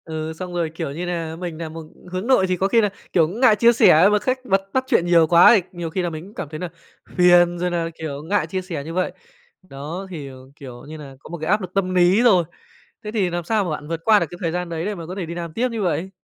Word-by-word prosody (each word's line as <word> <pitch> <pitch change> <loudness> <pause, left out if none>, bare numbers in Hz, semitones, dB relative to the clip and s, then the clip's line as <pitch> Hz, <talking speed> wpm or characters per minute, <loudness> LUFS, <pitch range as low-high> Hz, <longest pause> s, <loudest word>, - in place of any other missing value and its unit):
Ừ, 160 0 -5
xong 180 +2 -7
rồi, 170 -2 -1
kiểu 155 -3 -5
như 170 +5 -5
nà, 165 -2 -4
mình 175 -3 -5
nà 165 -1 -5
một 160 0 -9 0.3
hướng 185 +4 -4
nội 255 -8 +4
thì 185 0 -1
có 190 - +1
khi 230 +3 +3
là, 210 - +1 0.2
kiểu, 165 -3 +4
ngại 220 +5 +3
chia 235 +3 +5
sẻ 185 -4 +6
mà 210 - +3
khách 255 +3 -2
bật 195 -5 +2
bắt 260 - +1
chuyện 230 -10 +2
nhiều 170 -2 +4
quá 170 +2 +7
thì 205 - +3
nhiều 175 -2 -5
khi 185 +4 -2
là 175 - -1
mình 160 -1 -7
cũng 200 - -15
cảm 155 - -6
thấy 155 0 -7
là 180 - -4 0.5
phiền 175 -1 +5
rồi 180 +1 0
nà, 170 -1 -1
kiểu, 145 -3 -6
ngại 200 +6 0
chia 190 -1 -3
sẻ 175 -6 -6
như 160 +3 -7
vậy. 185 +1 -1 0.6
Đó, 155 +8 -6
thì, 150 -6 -7
ờ, 130 - -11 0.2
kiểu 125 -3 -11
như 155 - -8
là, 140 -3 -11
có - - -14
một 170 - -6
cái 160 +2 -3
áp 210 +2 +3
lực 185 -2 -8
tâm 185 -2 0
lý 180 +5 +4
rồi. 190 -8 +5 0.6
Thế 210 - -5
thì 205 -5 0
làm 175 0 -3
sao 215 +4 0
mà 180 - -3
bạn 150 -1 -5
vượt 165 0 -4
qua 215 -2 +6
được 170 - 0
cái 175 - -10
thời 165 -3 -1
gian 180 0 -3
đấy 165 0 -4
để 210 0 -3
mà 170 -3 -8
có 180 +3 -7
thể 190 -3 -4
đi 165 - -6
làm 170 -2 -6
tiếp 250 +6 0
như 225 -2 -3
vậy? 180 0 -1
175 Hz, 295 wpm, -21 LUFS, 160-195 Hz, 0.6 s, quá